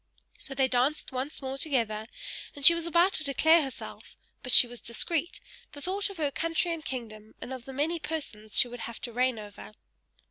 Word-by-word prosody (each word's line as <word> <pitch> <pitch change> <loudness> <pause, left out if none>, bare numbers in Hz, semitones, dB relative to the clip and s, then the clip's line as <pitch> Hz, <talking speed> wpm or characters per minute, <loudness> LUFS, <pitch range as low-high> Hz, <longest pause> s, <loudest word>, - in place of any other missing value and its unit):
So 270 - -8
they 265 0 +3
danced 260 +4 0
once 265 +3 -4
more 265 +1 -4
together; 225 -8 -1 0.5
and 285 -1 -1
she 340 - +12
was 335 0 -3
about 345 +3 +3
to 310 - 0
declare 320 +4 +4
herself, 270 -3 -7 0.3
but 250 - 0
she 245 - +9
was 240 0 -10
discreet; 330 +8 -1 0.4
she - - -8
thought 390 +6 -2
of 395 - -10
her 295 -3 0
country 330 +3 0
and 325 -2 -7
kingdom, 220 -6 -7
and 260 - -7
of 255 -2 -8
the 270 - -8
many 315 +5 -1
persons 220 -10 -5
she - - +7
would 245 0 -9
have 230 0 -6
to 240 - -5
reign 250 0 +1
over. 210 0 -10
270 Hz, 205 wpm, -28 LUFS, 240-320 Hz, 0.5 s, she